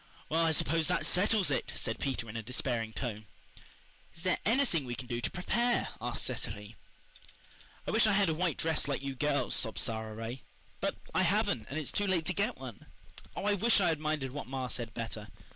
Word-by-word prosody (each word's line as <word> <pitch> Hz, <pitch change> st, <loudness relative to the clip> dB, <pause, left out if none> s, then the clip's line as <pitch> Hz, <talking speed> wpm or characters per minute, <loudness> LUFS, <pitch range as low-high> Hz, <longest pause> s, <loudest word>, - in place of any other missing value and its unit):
"Well, 165 Hz, +2 st, +3 dB
I 165 Hz, -, +4 dB
suppose 160 Hz, +1 st, +3 dB
that 180 Hz, -, +1 dB
settles 200 Hz, -2 st, +4 dB
it," 135 Hz, -, 0 dB
said 115 Hz, -, -2 dB
Peter, 130 Hz, -4 st, -2 dB
in 110 Hz, +1 st, -5 dB
despairing 115 Hz, -1 st, -1 dB
tone. 110 Hz, -3 st, -4 dB, 0.9 s
"Is 165 Hz, -, -10 dB
there 185 Hz, -1 st, +2 dB
anything 230 Hz, -, +3 dB
we 120 Hz, -1 st, -3 dB
can 130 Hz, -, -6 dB
do 120 Hz, -1 st, -3 dB
to 110 Hz, -, 0 dB
PREPARE?" 235 Hz, +7 st, +1 dB
asked 120 Hz, +1 st, -1 dB
Cecily. 105 Hz, -4 st, -4 dB, 1.1 s
"I -, -, -1 dB
wish 220 Hz, 0 st, +5 dB
I 215 Hz, -, +4 dB
had 200 Hz, -1 st, +4 dB
a 160 Hz, -, +2 dB
white 170 Hz, 0 st, 0 dB
dress 160 Hz, -2 st, +2 dB
like 140 Hz, -1 st, -1 dB
you 135 Hz, -1 st, -2 dB
girls," 145 Hz, +2 st, +1 dB
sobbed 110 Hz, -3 st, +1 dB
Sara 110 Hz, -1 st, 0 dB
Ray. 115 Hz, +4 st, -5 dB, 0.4 s
"But -, -, 0 dB, 0.2 s
I -, -, +4 dB
haven't, 110 Hz, -, +2 dB
and 140 Hz, -, -3 dB
it's 155 Hz, -, -2 dB
too 205 Hz, -, 0 dB
late 175 Hz, -4 st, +2 dB
to 180 Hz, -, 0 dB
get 215 Hz, +5 st, 0 dB
one. 125 Hz, -5 st, -9 dB, 0.5 s
Oh, -, -, -3 dB
I 205 Hz, -, +4 dB
wish 225 Hz, +3 st, +4 dB
I 180 Hz, -3 st, +4 dB
had 160 Hz, -2 st, +1 dB
minded 155 Hz, -4 st, -1 dB
what 145 Hz, -3 st, -5 dB
ma 130 Hz, -1 st, -3 dB
said 115 Hz, -2 st, -3 dB
better. 110 Hz, -2 st, -4 dB
140 Hz, 210 wpm, -32 LUFS, 115-180 Hz, 1.1 s, wish